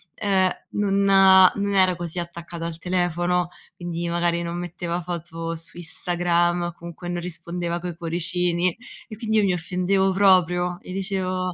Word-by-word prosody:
ehm, 190 -3 +2 0.2
non 200 -1 +1
non 195 +1 +6
era 185 -1 +5
così 170 0 -4
attaccato 170 0 -6
al 165 -1 -5
telefono, 175 0 0 0.3
quindi 175 -1 -4
magari 170 0 0
non 170 0 -4
metteva 175 0 -4
foto 165 -1 -5
su 165 +1 -5
Instagram 175 0 0
o 175 0 -3
comunque 170 +1 -9
non 175 0 -3
rispondeva 170 0 -3
coi 175 -1 -6
cuoricini 175 +1 0 0.3
e 215 - -9
quindi 220 -1 -1
io 215 - +4
mi 190 -2 +2
offendevo 185 +3 0
proprio 180 -2 +3
e 185 - -9
dicevo 185 -1 -2
175 Hz, 150 wpm, -23 LUFS, 170-185 Hz, 0.3 s, non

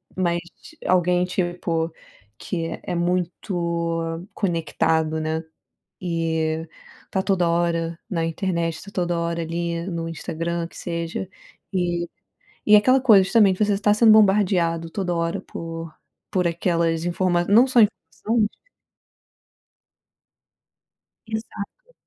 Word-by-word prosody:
mas 175 -2 +1 0.5
alguém, 180 0 +3
tipo, 175 -2 -1 0.5
que 165 -3 -3 0.2
é - - -4
muito 170 -1 -2
conectado, 160 -3 0
né. 160 +1 -2 0.6
Eh, 160 -2 -1 0.4
tá 190 - 0
toda 180 -4 +2
hora 170 -1 0
na 165 -4 -1
internet, 165 -1 -2
tá 200 - -11
toda 175 -2 -1
hora 170 0 -1
ali 170 +1 -3
no 165 -2 -3
Instagram, 165 +1 -3
que - - -15
seja, 170 +2 -4 0.4
eh, 175 -1 0 0.6
e 210 - +7
aquela 255 +5 +4
coisa, 215 -7 +7
justamente, 195 -3 +4
você 205 -1 +2
está 205 +1 +3
sendo 220 0 +6
bombardeado 185 -6 +3
toda 180 0 -2
hora 170 0 -1
por 165 -1 -7 0.4
por 180 -2 +2
aquelas 170 -1 0
informa 175 0 +1
não 225 +5 +6
só 255 -2 +3
informações 215 +1 +1 2.8
Exato. 220 - -7
170 Hz, 110 wpm, -23 LUFS, 165-190 Hz, 2.8 s, e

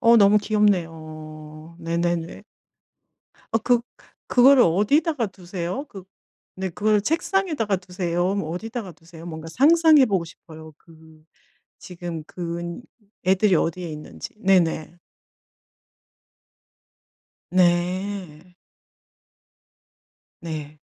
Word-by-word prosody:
어 230 0 +6
너무 205 0 +6
귀엽네요. 160 -6 -2
네네네. 170 0 -2 1.1
어 225 - +3
그 245 +1 +2 0.5
그거를 260 +1 +6
어디다가 240 - +2
두세요? 185 +5 -5
그 195 -6 -11 0.5
네 190 0 -3
그거를 210 +4 +1
책상에다가 310 - 0
두세요? 180 0 -2
뭐 200 -6 -3
어디다가 215 +2 -5
두세요? 165 0 -14
뭔가 160 -1 -7
상상해 310 - +6
보고 195 -7 0
싶어요. 160 -2 -13
그 160 -1 -19 0.6
지금 175 -3 -7
그 170 0 -5 0.5
애들이 190 +1 +3
어디에 170 +2 -1
있는지. 150 +6 -9
네네. 175 -5 +2 2.5
네. 180 -1 0 1.9
네. 155 -3 -7
180 Hz, 200 characters per minute, -23 LUFS, 165-210 Hz, 2.5 s, 어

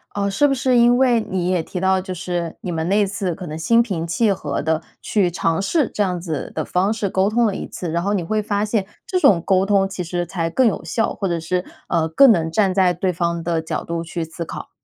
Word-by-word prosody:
呃， 200 -1 0
是 290 +9 +3
不 275 - +1
是 255 -1 +2
因 240 +1 +5
为 250 -3 +3
你 180 -1 -1
也 180 -3 +1
提 180 - -6
到 190 0 +2
就 185 0 -6
是 175 -1 -4
你 180 - -4
们 160 0 -2
那 205 +1 +3
次 195 -3 -3
可 185 - -8
能 155 -1 -6
心 230 +8 +4
平 175 -8 -3
气 205 +6 +2
和 150 -7 -2
地 160 +1 0 0.2
去 200 -5 +1
尝 165 0 0
试 280 - +1
这 - - -1
样 180 -3 0
子 160 -5 -4
的 155 - -1
方 185 +3 +1
式 220 -3 -2
沟 190 +2 +1
通 235 +2 +2
了 210 - +1
一 - - -5
次。 175 -3 -5
然 170 +1 0
后 200 +3 0
你 185 -4 0
会 215 +5 -1
发 205 -1 -1
现 210 -2 0 0.2
这 365 - 0
种 265 - +5
沟 190 +1 +2
通 195 -1 +3
其 190 -2 -5
实 175 +1 -2
才 170 -1 -2
更 260 +9 +2
有 220 - 0
效， 225 - -1
或 195 - -3
者 170 -2 -1
是 180 +2 -1 0.3
呃 165 -2 +1
更 260 - +7
能 165 -5 +1
站 190 +2 +2
在 185 -2 +3
对 180 +2 -1
方 170 0 -1
的 165 -1 0
角 160 - -4
度 170 0 -3
去 170 0 -4
思 165 +1 -6
考。 - - -8
185 Hz, 280 characters per minute, -20 LUFS, 170-205 Hz, 0.3 s, 更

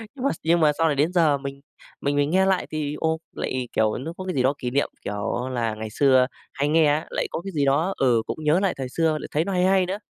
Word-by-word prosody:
Nhưng 260 - -7
mà - - +4
nhưng 170 +1 +3
mà 155 -2 +5
sau 165 - +3
này 150 - +1
đến 150 +6 +1
giờ 160 -5 +3
mình 140 0 -7 0.4
mình 140 0 0
mình 145 0 +2
nghe 190 +3 +3
lại 190 -1 +1
thì, 150 -1 -3
ô, 160 0 0
lại, 130 -1 -3
kiểu, 110 -1 +1
nó 155 +6 -6
có 185 - -6
cái 185 - -2
gì 130 - +2
đó 130 +2 +3
kỷ 125 -2 -4
niệm, 140 +2 +1 0.2
kiểu, 105 +5 -3
là 115 -3 -1
ngày 110 0 -6
xưa 130 +1 +4 0.3
hay 145 0 0
nghe 160 0 +4
á, 150 +2 +1
lại - - -2
có - - -3
cái 195 - -5
gì 145 -5 0
đó, 155 +8 +2
ừ, 120 -4 +3
cũng 155 - -5
nhớ 155 +4 +3
lại 195 -1 +1
thời 130 -1 -4
xưa 160 +4 +1
lại - - -7
thấy 155 +3 +1
nó 200 - -3
hay 180 0 +2
hay 190 -1 +3
nữa. 190 +2 -3
150 Hz, 285 wpm, -24 LUFS, 130-165 Hz, 0.4 s, mà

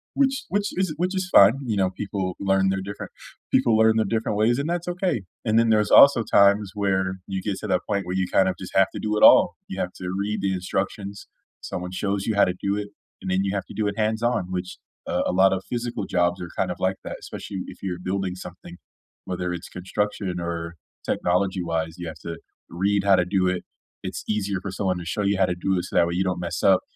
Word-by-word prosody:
Which 270 -1 +1
which 205 +1 0
is 185 0 -1
it - - -6
which 180 +3 -1
is 185 -1 -2
fine, 100 +2 +8
you 110 -4 -1
know, 95 -1 +2
people 95 -2 -4
learn 95 -1 +2
their 95 0 -1
different 100 +2 -7 0.4
people 110 -2 +4
learn 110 0 +5
their 110 - +2
different 110 0 -1
ways, 115 +3 +3
and 145 +3 -2
that's 175 0 -2
okay. 180 - -1 0.2
And 110 0 +3
then 115 0 +3
there's 105 -2 +2
also 140 -5 +8
times 100 -1 +4
where 95 -2 0
you 95 -1 -3
get 100 -2 -2
to 105 - -5
that 95 -2 +1
point 100 -2 -1
where 90 +1 -3
you 95 -1 0
kind 95 0 +4
of 95 - -2
just 95 - -9
have 95 0 +5
to - - -5
do 105 0 -1
it - - +1
all. - - +7
You 95 - -6
have 90 - -3
to 90 - -7
read 105 +1 -2
the 95 0 0
instructions, 100 +2 -4 0.3
someone 90 0 -5
shows 100 +1 -2
you 110 - 0
how 100 - +5
to 90 - -1
do 100 0 0
it, 105 0 -4 0.3
and - - -5
then 95 +1 +1
you 100 0 -1
have 100 - -2
to - - -10
do 105 -1 0
it 100 +1 -3
hands-on, 110 -3 0
which 90 0 -4 0.3
uh, - - 0
a - - 0
lot 95 +1 +4
of 95 0 -3
physical 120 -4 -3
jobs 90 0 0
are 85 - -6
kind 95 - 0
of - - -5
like 95 0 0
that, - - -6
especially 95 - -7
if - - -10
you're 90 -2 -3
building 95 -1 -2
something. 90 -1 -10 0.5
Whether 90 -1 -3
it's 85 - -7
construction 95 0 -3
or 85 -1 -4 0.3
technology 90 +1 0
wise, 80 -1 -2
you 90 -1 -6
have 80 -1 -8
to 85 -1 -5 0.3
read 100 +3 0
how 100 -1 +5
to 90 - +2
do 95 0 +1
it. 90 -1 -1 0.4
It's - - -5
easier 100 -3 -1
for 95 - -5
someone 95 -1 -1
to 90 - -7
show 90 +5 -2
you 100 0 +1
how 95 - +4
to 90 - -2
do 95 +2 0
it, 90 - -2
so - - -9
that 85 - +5
way 85 - -3
you 95 - +1
don't 90 -2 -1
mess 85 - -3
up, 95 -1 +5
95 Hz, 250 wpm, -24 LUFS, 90-105 Hz, 0.5 s, fine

